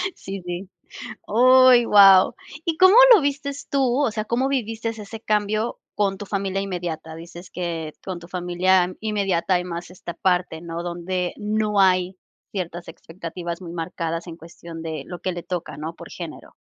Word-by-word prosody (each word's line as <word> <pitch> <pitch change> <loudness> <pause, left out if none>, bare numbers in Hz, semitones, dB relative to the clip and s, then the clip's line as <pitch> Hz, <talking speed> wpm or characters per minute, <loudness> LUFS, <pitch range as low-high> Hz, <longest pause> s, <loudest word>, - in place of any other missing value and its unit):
Sí, 195 0 -7
sí. 175 +2 -5 0.6
Uy, 255 +1 +6
guau, 195 -3 +7 0.3
¿y 325 -2 -1
cómo 375 +3 +7 0.2
lo 400 - +6
viste 280 0 -1 0.2
tú? 270 -1 +2
O 225 - 0
sea, 215 0 -3
¿cómo 250 +4 0
viviste 225 -4 -2
ese 220 0 -8
cambio 215 +1 -1 0.2
con 195 -2 0
tu 205 - -7
familia 195 -1 -2
inmediata? 170 -4 -5
Dices 170 +2 -11
que 165 -3 -4
con 185 -3 -5
tu 170 - -13
familia 180 +1 +1
inmediata 195 -4 0
hay 180 - 0
más 175 0 -6
esta 175 -1 -8
parte, 180 -3 0
¿no?, 170 0 -5
donde 175 +1 -3
no 210 -1 0
hay 185 0 +2 0.3
ciertas 175 -3 -5
expectativas 170 +1 -7
muy 170 -2 -8
marcadas 165 0 -4
en 165 0 -8
cuestión 165 0 -11
de 155 -3 -5
lo 175 -2 -7
que 185 - -1
le 175 - -6
toca, 175 -5 -5
¿no?, 160 +2 -6
por - - -11
género. - - -9
185 Hz, 170 wpm, -23 LUFS, 170-215 Hz, 0.6 s, guau